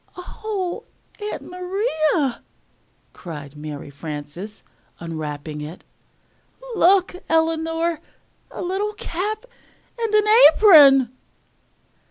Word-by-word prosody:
"Oh, 375 0 -5 0.4
Aunt 420 0 -5
Maria!" 360 - -1 0.7
cried 150 -4 -9
Mary 150 -1 -8
Frances 150 +7 -8 0.4
unwrapping 155 -2 -6
it. 155 +4 -9 0.9
"Look, 370 -1 +3
Eleanor! 325 0 0 0.5
a - - -7
little 390 +4 -2
cap 420 +4 -4 0.5
and 450 -2 0 0.4
apron!" 280 - +7
320 Hz, 75 wpm, -22 LUFS, -, 0.9 s, apron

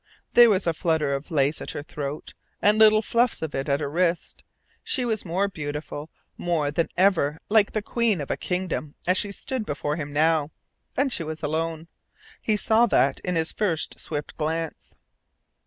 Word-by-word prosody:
There 240 -1 +8
was 195 -2 +2
a 170 - +2
flutter 160 -4 0
of 140 +4 -4
lace 145 -2 +1
at - - -6
her 145 - -5
throat, 145 0 -6 0.3
and 210 +1 +4
little 215 0 +6
fluffs 235 -4 +1
of 160 - -4
it 135 +2 -2
at 140 +2 +1
her 145 - -1
wrists. 170 +3 -1 0.4
She 255 -3 0
was 220 -4 -1
more 185 +4 0
beautiful, 150 -3 -6 0.3
more 160 -5 0
than 165 +2 0
ever 175 -6 +3
like 210 -1 +4
the 215 - -1
queen 230 -5 +1
of 140 - -4
a - - +1
kingdom 180 -5 -3
as 180 +1 +3
she 205 - -1
stood 255 +4 -4
before 150 -3 -3
him 145 -2 -5
now. 155 0 +2 0.5
And 275 -2 +2
she - - 0
was 160 0 -6
alone. 160 +2 -2 0.5
He 215 -1 +1
saw 225 +3 +4
that 135 - +2
in 180 -1 -2
his 160 0 +1
first 180 -7 -1
swift 150 -2 -5
glance. 160 +1 -3
165 Hz, 185 wpm, -25 LUFS, 150-205 Hz, 0.5 s, There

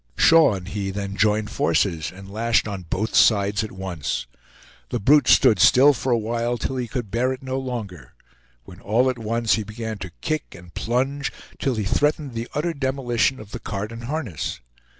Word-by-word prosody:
Shaw 165 -9 +6
and 90 -1 -7
he 100 -1 -3
then 100 0 -4
joined 105 +2 +1
forces, 80 0 0
and 95 +1 -12
lashed 115 0 +1
on 95 -4 -6
both 110 +6 -2
sides 100 -1 +4
at 110 - -6
once. 90 -9 -4 0.6
The - - -2
brute 140 +4 +4
stood 110 -3 +5
still 135 +10 +6
for 130 0 -2
a 120 - +4
while 115 +2 -1
till 130 +2 -3
he 125 -1 -2
could 115 -4 -5
bear 125 +4 +1
it 130 +1 -6
no 130 0 -2
longer, 105 - -6 0.5
when 90 +7 -13
all 120 +6 +2
at 125 - -9
once 115 +1 0
he 110 - 0
began 110 0 -6
to 90 - -6
kick 155 -2 -3
and 85 0 -14
plunge 135 +4 -1 0.3
till 135 -3 0
he 110 - -1
threatened 145 +6 0
the 115 +1 -4
utter 165 +3 0
demolition 130 -2 0
of 105 -1 -11
the - - -6
cart 105 +2 -5
and 115 +1 -8
harness. 125 - -4
115 Hz, 190 wpm, -23 LUFS, 100-130 Hz, 0.6 s, Shaw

